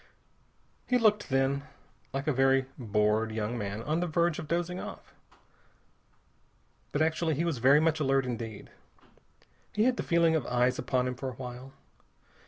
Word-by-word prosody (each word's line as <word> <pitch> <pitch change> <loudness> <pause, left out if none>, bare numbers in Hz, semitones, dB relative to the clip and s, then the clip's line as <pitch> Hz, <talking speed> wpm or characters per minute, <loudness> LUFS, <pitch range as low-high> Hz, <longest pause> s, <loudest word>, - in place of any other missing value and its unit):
He 250 - +3
looked, 210 -3 +2
then, 135 +1 +1 0.5
like 135 +1 -3
a 155 - +1
very 135 0 +3
bored 105 -1 +1
young 110 +1 -2
man 105 -1 -4
on 155 +5 0
the 180 - -1
verge 170 0 +1
of 155 - -6
dozing 175 +2 -1
off. - - -9 1.8
But 145 - +1
actually 160 0 0
he 165 +5 0
was 160 -7 -1
very 135 +5 +6
much 160 0 +2
alert 135 -2 +2
indeed. 115 -4 -6 1.0
He 210 - +2
had 250 +1 +2
the - - -1
feeling 170 -1 +3
of 155 - 0
eyes 125 +1 +1
upon 125 0 0
him 125 - -2
for 130 +1 -5
a 125 - -9
while. 125 +1 -8
135 Hz, 165 wpm, -29 LUFS, 125-165 Hz, 1.8 s, very